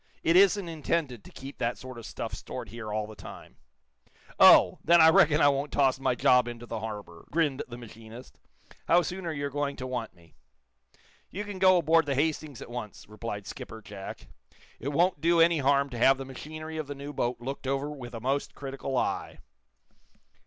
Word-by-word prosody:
"It 165 - +3
isn't 195 0 +5
intended 155 -7 -2
to - - -14
keep 135 +1 -10
that 120 +1 -1
sort 130 -2 -9
of 115 - -9
stuff - - -6
stored - - -7
here 110 -2 -7
all 105 0 -1
the 110 0 -11
time." - - -12 0.8
"Oh! - - +7
Then 170 +1 +5
I 160 0 +8
reckon 155 0 +5
I 145 - +6
won't 140 +1 -1
toss 135 -2 +2
my 130 -2 +1
job 125 0 +4
into 120 0 -7
the 115 -1 -5
harbor," 105 -6 -8
grinned 150 -4 0
the 120 -1 -9
machinist. 115 +1 -12 0.5
"How 175 +1 +5
soon 180 0 -5
are - - -1
you 145 -2 -3
going 145 0 -2
to 130 - -6
want 125 -6 -4
me?" 85 -2 -22 1.0
"You 205 - -5
can 205 -2 -7
go 185 -1 +6
aboard 165 -2 +3
the 140 - 0
'Hastings' 150 -2 -2
at - - -12
once," 120 -4 -7
replied 105 -1 -6
Skipper 110 - -8
Jack. 100 -2 -9 0.5
"It 130 - -6
won't 170 +2 +1
do 170 +1 +3
any 165 -1 +5
harm 140 0 +3
to 120 - -6
have 135 +2 +5
the 135 - -6
machinery 155 +4 -8
of 155 -2 -4
the 145 - -6
new 140 +1 -8
boat 120 -2 -2
looked 135 +2 -6
over 135 +2 -1
with 125 -5 -8
a - - -5
most 135 +4 -2
critical 135 -1 -4
eye." - - -2
135 Hz, 200 wpm, -28 LUFS, 120-155 Hz, 1.0 s, I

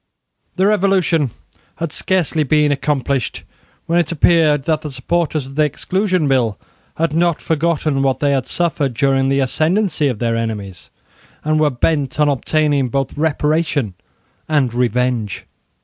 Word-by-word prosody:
The 190 - +2
Revolution 190 -7 +2 0.5
had 165 -2 -4
scarcely 175 -3 0
been 150 0 +2
accomplished 140 -2 -1 0.4
when 170 +1 +2
it 170 -2 0
appeared 155 -3 +3
that 155 -2 0
the 150 -2 -6
supporters 155 +2 -1
of 135 - -11
the 155 +2 +2
Exclusion 185 +3 0
Bill 125 -6 +1 0.4
had 165 -1 0
not 170 0 +1
forgotten 155 -3 0
what 135 -1 +1
they 145 -1 +1
had 135 -4 0
suffered 150 -7 0
during 135 +1 +2
the 135 0 +2
ascendancy 160 +4 +1
of 125 -5 -2
their 115 0 -1
enemies, 105 -5 -5 0.5
and 155 0 +1
were 155 -1 +3
bent 140 +1 -1
on 150 -1 +4
obtaining 145 0 +1
both 135 +2 -2
reparation 150 - 0 0.6
and 140 -6 +1
revenge. 125 -3 -1
145 Hz, 145 wpm, -18 LUFS, 130-160 Hz, 0.6 s, on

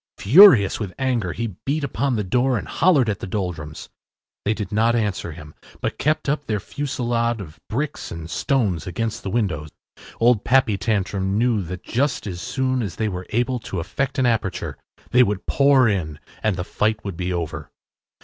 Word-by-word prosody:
Furious 125 - +7
with 95 -5 -5
anger, 120 -9 0
he 110 -1 -4
beat 145 +2 -1
upon 130 +1 0
the 105 - -1
door 125 +6 +1
and - - -5
hollered 155 -9 +3
at 100 -2 -1
the - - -6
Doldrums. 90 -6 -4 0.6
They 105 +2 +1
did 105 -2 -5
not 115 +3 +3
answer 105 -6 -1
him, 75 -1 -11 0.3
but - - -3
kept 155 +1 0
up 145 0 -1
their 105 -2 0
fusillade 120 -2 -2
of 80 -6 -10
bricks 140 +6 -3
and 80 -1 -7
stones 105 - 0
against 110 +5 -3
the 100 - -4
window. 95 -9 -1 0.5
Old 115 -3 +4
Pappy 130 -4 +3
Tantrum 100 -1 -1
knew 115 -2 +2
that 90 0 -7
just 135 +4 -1
as 90 -3 -5
soon 130 -1 -1
as 95 -6 -4
they 110 +1 -1
were 90 -1 -6
able 125 +2 0
to 95 -5 -5
effect 135 +11 -3
an 130 - +2
aperture 115 -5 -1 0.4
they 125 - +6
would 105 -4 +1
pour 140 -3 +4
in 85 -8 -1 0.2
and 110 -3 +1
the 90 - -3
fight 110 +3 -1
would 100 -3 -4
be 90 +2 -3
over. 85 -3 -4
110 Hz, 185 wpm, -22 LUFS, 95-125 Hz, 0.6 s, Furious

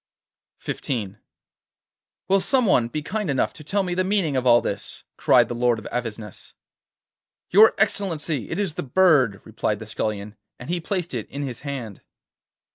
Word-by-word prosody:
XV 105 -7 -3 1.1
'Will 195 +1 +4
some 255 +5 +2
one 125 - +3
be 150 +5 -4
kind 210 +2 -3
enough 135 -2 0
to 155 - -12
tell 200 +7 0
me 180 -1 -2
the 185 +1 +1
meaning 185 -7 +1
of 130 -1 0
all 120 -1 +7
this?' - - -5
cried - - +4
the - - -4
Lord 120 0 +2
of 110 - -10
Avesnes. 110 -4 -6 1.0
'Your 215 +4 +7
Excellency, 165 - -1
it 165 - -3
is 200 -6 -1
the - - -4
bird,' 140 - +3
replied 110 -1 -2
the 110 - -9
Scullion, 105 -1 -4 0.2
and 125 +7 -7
he 175 - 0
placed 175 -1 -3
it 115 -4 -4
in 140 +2 -5
his 130 -4 -5
hand. 130 -8 -6
140 Hz, 170 wpm, -23 LUFS, 115-185 Hz, 1.1 s, all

